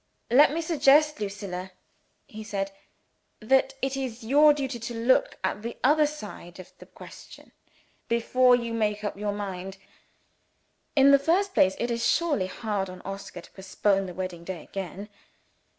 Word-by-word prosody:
"Let 280 +4 +6
me 325 +2 -2
suggest, 300 -1 +3
Lucilla," 195 -3 -5 0.6
he 220 0 -10
said, 195 -2 -3 0.7
"that 265 +4 +2
it 270 0 0
is 250 -4 -5
your 290 +6 +5
duty 270 -4 -3
to 235 +1 -6
look 260 - +2
at - - -2
the 235 +2 -6
other 300 +3 +4
side 210 - -9
of 185 - -12
the - - -13
question, - - -14 0.6
before 250 +2 +3
you 235 -1 -3
make 210 -2 -1
up 205 - -3
your 205 +1 -3
mind. 195 -2 -6 1.2
In 275 -1 +6
the 280 - +6
first 375 +7 +1
place, 190 - +3
it 240 +1 -2
is 235 0 -2
surely 295 - +1
hard 200 0 -3
on 185 - -10
Oscar 195 +1 -8
to - - -18
postpone 195 0 -1
the 180 - -8
wedding 185 -2 -5
day 175 -3 -7
again. 195 +1 -7
225 Hz, 160 wpm, -26 LUFS, 195-270 Hz, 1.2 s, Let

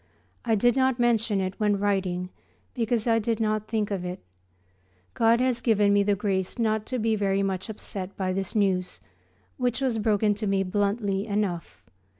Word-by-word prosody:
I 225 -2 +2
did 240 +3 +3
not 260 -2 +2
mention 230 -4 +2
it 185 0 -3
when 210 -1 +2
writing 190 -3 -1 0.4
because 230 -2 0
I 225 -1 +3
did 225 +1 -1
not 215 -1 0
think 215 -2 -1
of 190 -3 -2
it. 180 0 -4 1.0
God 230 +1 +3
has 250 -2 +1
given 210 -4 +3
me 205 - +4
the 200 0 +2
grace 195 -1 -2
not 220 -2 0
to 255 - -2
be 225 -1 +1
very 200 -1 +1
much 190 +1 -2
upset 195 -2 -6
by 185 -1 -1
this 195 +1 -3
news, 185 - 0 0.6
which 250 -1 0
was 255 -5 0
broken 210 -1 +2
to 210 +1 -3
me 195 -1 +2
bluntly 200 +1 -1
enough. 200 -5 -3
210 Hz, 175 wpm, -26 LUFS, 195-225 Hz, 1.0 s, me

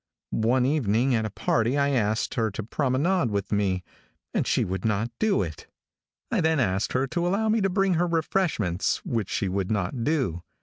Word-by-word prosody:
One 125 +3 +2
evening 130 -3 +2
at 110 -2 +1
a - - -6
party 115 +5 0
I 140 0 +2
asked 110 -4 0
her 110 -1 0
to 110 +2 -5
promenade 140 - +1
with 100 -1 -2
me, 95 -3 +1 0.5
and - - 0
she - - +2
would 95 0 -3
not 110 +2 0
do 215 - +2
it. 80 -3 -8 0.6
I - - +2
then 160 -1 +2
asked 100 -4 0
her 130 +1 +2
to 170 +6 -1
allow 210 +4 +1
me 220 0 +2
to 195 - +2
bring 195 0 +2
her 175 +1 +1
refreshments, 160 - 0
which 115 -5 -2
she 100 - -1
would 95 0 -1
not 105 +3 -1
do. 130 - 0
120 Hz, 190 wpm, -26 LUFS, 100-160 Hz, 0.6 s, One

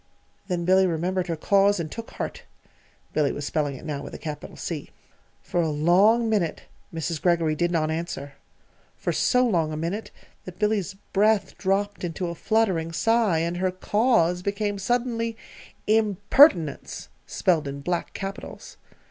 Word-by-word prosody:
Then 175 -3 -2
Billy 190 +1 +5
remembered 180 +2 -1
her 170 - -1
Cause, 200 +4 +3
and 155 -2 -4
took 230 -1 -7
heart - - -5 0.7
Billy 150 -3 +2
was 145 - -5
spelling 145 -2 -1
it 130 - -11
now 145 -2 -3
with - - -8
a - - -5
capital 150 -2 -7
C. - - -5 0.5
For 175 - 0
a 165 - 0
long 185 +10 +4
minute 205 -7 0 0.3
Mrs. 165 -1 -3
Greggory 170 -3 +2
did 175 +3 +1
not 160 -2 0
answer 160 -4 -4 0.6
for - - -2
so 250 0 +3
long 170 -9 +1
a 155 - -4
minute 175 +7 -3 0.4
that 185 -1 -9
Billy's 210 -2 0 0.2
breath 205 -1 +2
dropped 200 +1 -1
into 175 +1 -3
a - - -4
fluttering 185 -5 0
sigh, 220 -2 +2
and 170 +1 -2
her 185 +1 +1
Cause 185 -2 +2
became 200 +1 -2
suddenly 230 +1 -1 0.5
"IMPERTINENCE" 210 - +3 0.2
spelled 160 -5 +1
in 140 0 -6
black 175 +3 -2
capitals. 195 0 -7
180 Hz, 155 wpm, -25 LUFS, 165-205 Hz, 0.7 s, Billy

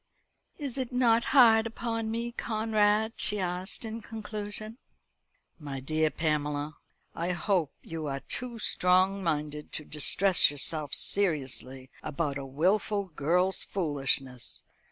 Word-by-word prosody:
"Is 275 -3 -4
it 255 -1 -3
not 235 -2 +3
hard 230 -5 +5
upon 225 -1 -3
me, 235 +1 -3
Conrad?" 220 -1 +1
she 210 - 0
asked 185 +4 -3
in 225 +1 -6
conclusion. 215 +1 -7 0.8
"My 140 -3 -6
dear 155 +3 0
Pamela, 150 -1 -2 0.4
I 175 +2 -2
hope 175 -3 0
you 160 -2 -6
are 140 -1 -4
too 245 -2 -3
strong 185 -1 +2
minded 150 -2 -3
to 155 - -4
distress 175 +6 +5
yourself 145 0 +2
seriously 135 -8 0
about 145 -2 -3
a 135 - -6
wilful 195 +7 0
girl's 180 +5 +1
foolishness. 135 - -2
180 Hz, 120 wpm, -28 LUFS, 150-220 Hz, 0.8 s, hard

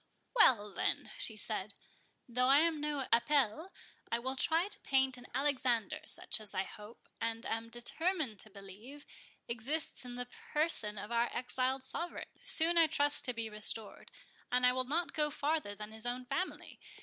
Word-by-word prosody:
"Well, 215 - +4
then," - - -1
she 220 - +2
said, 210 -1 -4 0.5
"though 250 +1 +1
I 275 +2 +7
am 325 -2 +1
no 295 -3 -1
Apelles, 280 - +2 0.4
I 230 - +2
will 260 +3 -2
try 325 +7 +2
to 415 0 -8
paint 265 -1 +2
an 250 0 -11
Alexander, 255 -6 +1
such - - -1
as 210 - -5
I 190 - +1
hope, 210 +3 -12
and 230 +1 -2
am 225 0 -3
determined 255 - -1
to 215 - -8
believe, 205 +8 -11 0.4
exists 265 +7 -1
in 245 -1 -8
the 245 0 -3
person 245 -5 -1
of 205 +3 -6
our 235 0 +2
exiled 255 +1 0
sovereign, 340 +6 -5
soon 335 +1 +4
I 330 - +7
trust 290 -1 +2
to 250 - 0
be 230 -1 -2
restored. 210 0 +1 0.4
And 250 0 +3
I 250 - +5
will 255 0 0
not 330 +6 -1
go 300 -1 +1
farther 290 -7 -1
than 210 +1 -8
his 220 +2 -4
own 250 +1 -2
family. 365 +9 -4
250 Hz, 175 wpm, -34 LUFS, 225-295 Hz, 0.5 s, I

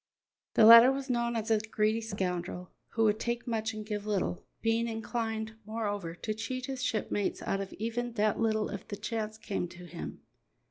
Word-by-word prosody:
The 220 - +7
latter 230 +3 +11
was 270 -1 -2
known 235 -1 0
as 225 0 -1
a 220 - +5
greedy 215 +1 0
scoundrel, 180 -4 -3 0.2
who 225 - +2
would 215 0 +3
take 235 0 -2
much 220 -2 -1
and 215 -1 -6
give 210 -1 -4
little, 195 -4 -1 0.2
being 225 +1 +2
inclined, 225 -1 -3
moreover, 205 -5 -3
to 215 +4 -3
cheat 250 +4 -4
his 265 -1 -4
shipmates 215 -5 -1
out 195 - -1
of 195 - -6
even 230 +2 -3
that 215 -2 +1
little 220 -1 +1
if 200 - -6
the 210 - -4
chance 215 0 -3
came 200 -4 -3
to 175 +1 -11
him. 170 -1 -7
220 Hz, 185 wpm, -31 LUFS, 205-230 Hz, 0.2 s, latter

